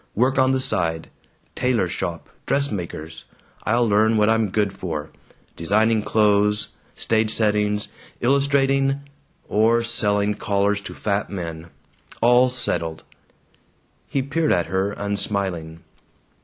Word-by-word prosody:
Work 130 +4 +2
on 130 0 +4
the 130 0 +2
side 80 -9 0 0.4
tailor 125 -7 +1
shop, 85 -2 -4 0.2
dressmaker's. 90 - -2 0.4
I'll 120 +2 +2
learn 110 +2 +3
what 105 0 +3
I'm 110 -2 +2
good 100 0 0
for: 80 -5 -5 0.4
designing 110 +6 +2
clothes, 105 0 +2 0.3
stage 110 -1 +1
settings, 105 -1 +1 0.3
illustrating, 135 +1 +2 0.5
or 115 +2 +3
selling 105 -3 +1
collars 100 0 0
to - - -9
fat 105 -1 -1
men. 85 -3 -6 0.5
All 125 +2 +5
settled." 85 -10 -2 1.0
He 135 - -1
peered 155 +3 0
at 85 -2 +2
her, 95 +2 -1
unsmiling. 100 -6 -3
105 Hz, 115 wpm, -22 LUFS, 95-120 Hz, 1.0 s, All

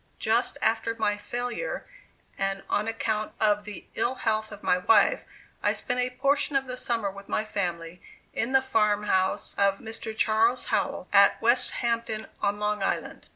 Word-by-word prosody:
Just - - +1
after 230 - +1
my 210 -2 +1
failure, 245 - -4 0.5
and 195 0 -2
on 210 +2 +1
account 220 -1 -2
of 210 -1 +2
the 210 -3 -8
ill 255 - 0
health 220 -2 -1
of 210 0 -10
my 180 +2 +2
wife, 205 +2 +4 0.4
I - - +2
spent 250 -1 -2
a 250 0 +1
portion 275 +3 +1
of 270 0 +2
the 255 -1 -5
summer 230 -5 -1
with 200 +1 -12
my 215 - 0
family 175 -4 -4 0.3
in 230 +3 -1
the 265 0 +4
farmhouse 210 -6 +1
of 200 -1 +3
Mr. 220 0 -7
Charles 225 +3 +2
Howell, 185 - -1
at 200 0 +6
Westhampton, 230 -2 +1 0.2
on 205 0 0
Long 210 0 -1
Island. 195 - -2
215 Hz, 160 wpm, -27 LUFS, 200-240 Hz, 0.5 s, at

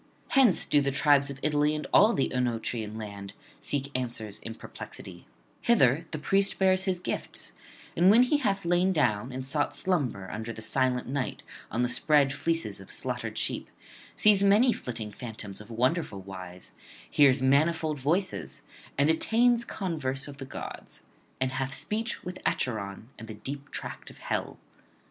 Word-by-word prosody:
Hence 260 -9 +4
do 145 - +3
the 140 - +1
tribes 140 0 +3
of 140 -1 -7
Italy 150 0 +2
and 150 - -4
all 215 +3 +7
the 135 - 0
Oenotrian 115 -3 -2
land 100 -2 -7 0.3
seek 140 -1 -2
answers 115 -5 -4
in 115 - -7
perplexity; - - -10 0.3
hither 160 - +3
the 155 - -4
priest 195 +6 +2
bears 190 0 +3
his 190 -2 +1
gifts, 180 - -5 0.4
and 175 +3 +5
when 230 +5 +7
he 270 +4 +3
hath 195 -9 -1
lain 175 +2 +3
down 120 - +1
and 130 +1 -5
sought 145 +2 -1
slumber 130 - -1
under 110 +2 -4
the 110 -1 -8
silent 125 +2 0
night 135 0 -3 0.3
on 120 +3 0
the - - +2
spread 140 +3 +3
fleeces 145 -9 -1
of 95 - -12
slaughtered - - -4
sheep, - - -2 0.5
sees 210 -2 +5
many 210 +5 +5
flitting 115 -4 -6
phantoms 110 -3 -7
of 105 - -13
wonderful 125 - 0
wise, 90 -1 -9 0.4
hears 140 -2 +4
manifold 155 +2 +2
voices, 175 +8 -1 0.3
and 140 +1 +4
attains 235 +8 +3
converse 150 - -2
of 140 -1 -9
the 135 - -7
gods, 130 - -8 0.4
and 130 0 0
hath 135 +1 -2
speech 220 +2 -2
with 180 +1 -7
Acheron 110 -2 -2
and 110 - -9
the 110 - -7
deep 140 +5 -6
tract - - -6
of - - -14
hell. - - -3
140 Hz, 165 wpm, -28 LUFS, 115-175 Hz, 0.5 s, all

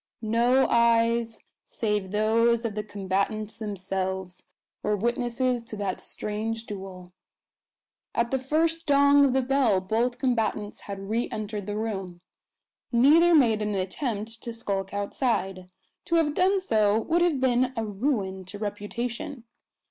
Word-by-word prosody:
No 240 +4 +3
eyes 230 -1 +2 0.2
save 210 -4 -2
those 230 +3 +2
of 225 - -2
the 210 0 -3
combatants 205 +2 -2
themselves 190 -3 -4 0.4
were 210 - +1
witnesses 240 +2 0
to 220 - -6
that 200 -3 -3
strange 220 +2 -4
duel. 190 -3 -8 1.0
At 235 0 +1
the 265 - +1
first 320 +5 0
dong 285 0 +6
of 265 - +2
the 265 0 +2
bell 255 -7 +3
both 225 +6 -1
combatants 225 -5 -1
had 195 -1 -6
re 235 +2 0
entered 210 -2 -5
the 205 0 -3
room. 195 -5 -4 0.7
Neither 310 +8 +6
made 230 -7 +4
an 210 -1 -1
attempt 220 +3 -3
to 235 - -5
skulk 200 -4 -3
outside. 200 -3 -2 0.4
To 340 - 0
have 315 -3 +2
done 380 +4 +3
so 215 - +2
would 335 +8 +1
have 340 -6 +2
been 255 0 +2
a 225 - -1
ruin 200 -3 -2
to 190 +3 -8
reputation. 235 +6 -4
225 Hz, 140 wpm, -26 LUFS, 205-250 Hz, 1.0 s, dong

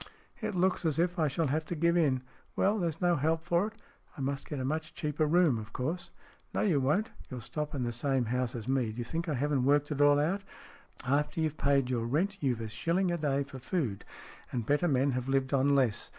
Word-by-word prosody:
"It 215 -3 -2
looks 185 +1 +2
as 160 -3 +1
if 175 +2 +1
I 155 - +3
shall 155 +4 0
have 155 +3 0
to 175 - -4
give 170 +2 +2
in. 135 -7 +2 0.3
Well, 210 +2 +2
there's 165 -3 -1
no 175 -1 +3
help 160 +3 +1
for 175 +3 +2
it. 220 - -9 0.4
I - - -5
must 135 +1 -3
get 145 - -3
a 130 - -2
much 155 +3 -3
cheaper 155 -2 0
room, 160 -7 +4
of 110 0 -9
course." 165 +8 -3 0.2
" - - -32
No, - - +1
you 175 -9 +3
won't. 150 +12 +1 0.2
You'll 130 - -5
stop 150 +5 -4
in 130 - -1
the 120 -1 -2
same 130 +1 0
house 125 +1 -1
as 115 -1 -6
me. 130 -4 +1
D'you 120 +2 -4
think 165 +7 -3
I 150 - 0
haven't 140 0 +1
worked 145 +2 +3
it 145 -1 -1
all 145 0 +6
out? 185 +7 0 0.6
After 145 +5 +1
you've 155 -1 0
paid 140 -2 +2
your 115 -2 0
rent, 190 +10 0
you've 125 -5 0
a 110 - -3
shilling 170 - 0
a 175 - 0
day 140 -2 +1
for 135 -1 -10
food, 130 - -2 0.5
and 120 -3 -2
better 145 +7 +2
men 135 -2 +2
have 125 +1 -2
lived 135 0 +1
on 140 +1 +4
less. 125 -6 +1
145 Hz, 235 wpm, -31 LUFS, 130-165 Hz, 0.6 s, all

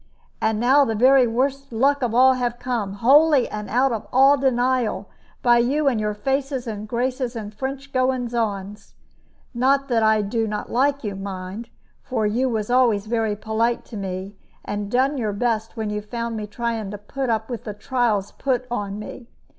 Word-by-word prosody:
And 220 -1 +1
now 265 +5 +5
the 225 -4 -1
very 255 +2 +5
worst 275 +3 -1
luck 275 +5 +2
of 235 -2 -1
all 260 +1 +6
have 245 -2 -2
come, 240 -6 -3
wholly 275 +5 +5
and 210 0 -6
out 255 +3 +2
of 225 -3 -4
all 270 +3 +6
denial, 255 -3 0 0.4
by 240 -1 +5
you 280 +5 +1
and 245 -5 +2
your 210 0 -1
faces 270 +3 -2
and 215 -2 -5
graces 250 +2 -2
and 215 -2 -6
French 270 +4 -6
goings 255 -2 0
on. 205 -3 -2 0.8
Not 270 +3 +2
that 235 -2 +2
I 220 -1 +3
do 225 +2 -1
not 210 0 -4
like 280 +3 +1
you, 205 -3 -3
mind; 195 +3 -6 0.3
for 235 -5 -2
you 235 +5 +1
always 220 -3 -2
was 235 -5 +3
very 220 -1 0
polite 220 +3 -1
to - - -11
me, 190 0 -5 0.3
and 205 0 -4
done 265 +4 +1
your 215 -3 -1
best 225 +1 -1
when 215 -1 -2
you 210 0 -2
found 230 +2 -4
me 210 -1 -4
trying 225 -1 -3
to 205 - -6
put 260 +6 -4
up 220 -1 0
with 240 -3 -6
the 210 -2 -5
trials 220 -4 0
put 255 -2 -1
on 205 -4 -3
me. 230 +3 -9
235 Hz, 185 wpm, -22 LUFS, 210-260 Hz, 0.8 s, all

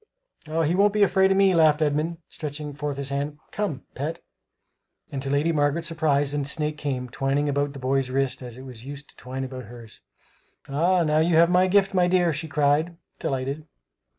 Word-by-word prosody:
"He 160 +1 +1
won't 200 +2 +4
be 210 -1 +4
afraid 190 0 +4
of 195 - +3
me," 195 -1 +5
laughed 155 -3 +5
Edmund, 155 +2 0
stretching 150 -1 -6
forth 145 -1 -4
his 140 -1 -3
hand; 140 +2 -3
"come, 185 -11 -3
pet!" 150 +5 -4 0.9
And 135 - -3
to 135 - -4
Lady 145 +4 +2
Margaret's 155 +2 +1
surprise 145 -4 +1
the 145 -1 -1
snake 150 +2 -2
came, 130 -3 -2
twining 135 +3 0
about 145 0 0
the - - -8
boy's 135 0 0
wrist 130 -1 -1
as 120 -2 -8
it 130 - -9
was 125 -4 -10
used 140 +2 -9
to - - -20
twine 130 +1 -6
about 130 -1 -6
hers. 115 -1 -12 0.7
"Ah, 155 +1 +2
you 165 +1 +3
have 170 +2 +5
my 185 +1 +4
gift, 195 +1 +3
my 180 -2 +3
dear!" 175 -2 +3
she 160 +2 -4
cried, 150 +3 +1 0.2
delighted. 135 +4 -3
145 Hz, 190 wpm, -25 LUFS, 135-165 Hz, 0.9 s, me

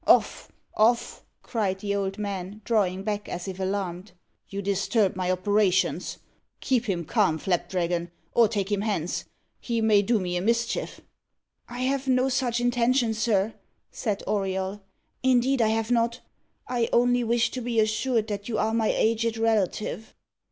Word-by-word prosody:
"Off - - +3 0.2
off!" 235 +2 +2 0.2
cried 210 -6 -1
the 200 0 -2
old 195 0 -2
man, 200 -1 -4
drawing 195 -5 +1
back 205 0 -3
as 175 +2 -5
if 190 0 -6
alarmed. 190 -1 -3 0.4
"You 200 0 -4
disturb 200 +1 +1
my 185 -1 -1
operations. 190 +1 +1 0.4
Keep 250 -2 +1
him 175 -6 -2
calm, 195 -7 +2
Flapdragon, 175 0 -1 0.2
or 235 -2 +5
take 205 -2 -2
him 205 -1 +1
hence. 200 -6 -2 0.3
He 235 -2 -2
may 215 -2 +4
do 220 +2 +1
me 180 -1 -2
a - - -1
mischief." 230 +3 -1 0.7
"I 245 +1 -6
have 270 +1 0
no 255 0 +3
such 245 -2 0
intention, 245 0 +2
sir," 215 -1 +1 0.4
said 210 -5 -3
Auriol; 195 0 -2 0.4
"indeed 260 0 +3
I 220 - +4
have 220 +1 0
not. 235 +1 +1 0.5
I 240 -2 0
only 245 0 +3
wish 235 +1 +1
to 255 - -4
be 235 -1 0
assured 220 +2 +1
that 205 +1 -4
you 220 - -1
are 220 +1 +1
my 225 -1 +2
aged 225 +1 +1
relative." 220 0 -1
215 Hz, 155 wpm, -26 LUFS, 195-235 Hz, 0.7 s, or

